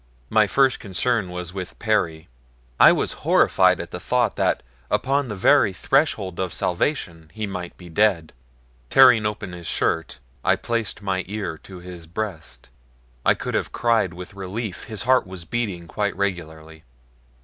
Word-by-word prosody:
My 110 -1 +4
first 135 +3 +3
concern 100 +2 -1
was 90 -1 -6
with 95 -2 -6
Perry. 90 -8 0 0.5
I - - +9
was - - 0
horrified - - +4
at - - -6
the - - -5
thought - - +1
that - - +1 0.3
upon 140 +1 +1
the 105 - -5
very 100 +1 +4
threshold 105 - 0
of 95 -2 -2
salvation 85 - -2
he 110 -1 -2
might 90 -3 -6
be 90 - -12
dead. 85 -2 +1 0.6
Tearing 115 -5 +6
open 105 -2 -5
his 85 -1 -8
shirt 80 -1 -1 0.3
I - - +4
placed 115 -3 -3
my 95 -1 -1
ear 100 -4 -4
to 95 -2 -12
his 90 -2 -10
breast. 90 -2 -6 0.6
I - - +4
could - - -5
have - - -1
cried 115 -7 +1
with 90 +1 -9
relief 100 +1 -5
his 110 -2 -5
heart 130 -3 +3
was 90 -2 -8
beating 95 -4 -3
quite 100 +4 -2
regularly. 80 -5 -4
95 Hz, 160 wpm, -23 LUFS, 85-110 Hz, 0.6 s, I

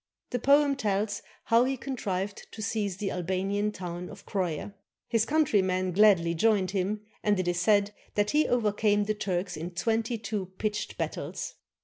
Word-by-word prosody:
The 245 - 0
poem 280 +2 +4
tells 205 -4 -1 0.2
how 230 +1 +4
he 265 +1 -1
con 265 +2 -4
trived 195 -2 -3
to 215 - -9
seize 200 -3 -1
the 195 -2 -2
Albanian 190 +4 -1
town 180 -2 -6
of 200 -1 -12
Croia. 185 -1 -2 0.3
His 230 -2 +2
countrymen 190 -12 +2
gladly 185 -4 +5
joined 195 +1 +2
him, 200 +2 -1 0.2
and 205 -2 +2
it 185 - -1
is 175 0 +1
said 205 +1 +3 0.2
that 205 0 +2
he 305 +1 +3
overcame 210 -3 +2
the 215 +1 0
Turks 185 -3 -2
in 165 +3 -4
twenty 225 +4 0
two 210 -3 -3
pitched 210 -1 -2
battles. - - -4
205 Hz, 165 wpm, -28 LUFS, 185-220 Hz, 0.3 s, gladly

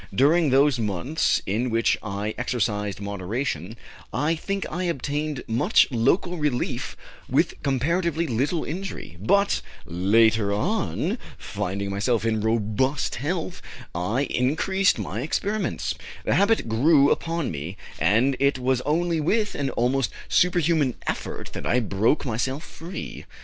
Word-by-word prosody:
During 155 +4 +4
those 135 0 +4
months 110 - 0
in 115 +6 0
which 115 0 +2
I 105 0 -3
exercised 105 -5 -1
moderation, 100 - -3 0.3
I 150 +3 +1
think 195 +4 -3
I 180 +1 -3
obtained 150 -2 -2
much 120 - +4
local 155 +9 +1
relief 145 -5 -2 0.3
with - - +1
comparatively 165 +5 0
little 140 +5 0
injury, 175 - -6
but, 200 - +2 0.2
later 100 +4 +3
on, 200 - -1 0.2
finding 100 -1 -3
myself 110 +3 0
in 110 -1 +1
robust 115 +5 0
health, 170 +5 -3 0.3
I 105 +10 0
increased 170 +10 +1
my 105 +1 -4
experiments, 205 +9 -1 0.3
the - - +2
habit 200 - +3
grew 140 +6 +4
upon 165 -1 -1
me, 80 +5 -6 0.2
and 115 +11 +3
it 140 -1 +3
was 130 0 +1
only 165 +3 0
with 210 +7 +1
an 140 -2 -1
almost 125 +1 +1 0.2
superhuman 165 -7 +2
effort - - -4
that - - -4
I 125 - +3
broke 110 +6 +1
myself 130 +4 -2
free. 170 +2 -8
130 Hz, 130 wpm, -25 LUFS, 110-165 Hz, 0.3 s, During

